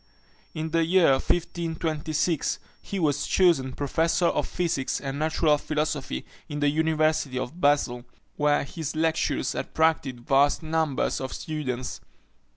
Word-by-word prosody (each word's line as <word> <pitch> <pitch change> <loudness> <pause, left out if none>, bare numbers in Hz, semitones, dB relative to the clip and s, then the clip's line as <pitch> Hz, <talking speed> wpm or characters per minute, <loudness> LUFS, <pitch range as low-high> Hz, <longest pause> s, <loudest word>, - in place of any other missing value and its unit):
In 155 0 -3
the 165 0 +3
year 170 -2 +4
1526, 160 +1 -1 0.2
he 200 - -5
was 145 -4 +1
chosen 160 -9 +3
professor 165 +5 +1
of - - +1
physics 165 -7 -1
and 140 0 -4
natural 155 -1 +2
philosophy 150 - -2 0.2
in 145 - -4
the 145 0 +3
University 155 -3 +1
of 140 +7 -5
Basle, 135 -5 +2 0.3
where 150 0 +2
his 155 +1 -5
lectures 160 0 0
attracted 150 -6 0
vast 140 +4 +3
numbers 160 -5 0
of 130 - -4
students. 130 -5 -4
155 Hz, 125 wpm, -26 LUFS, 140-160 Hz, 0.3 s, year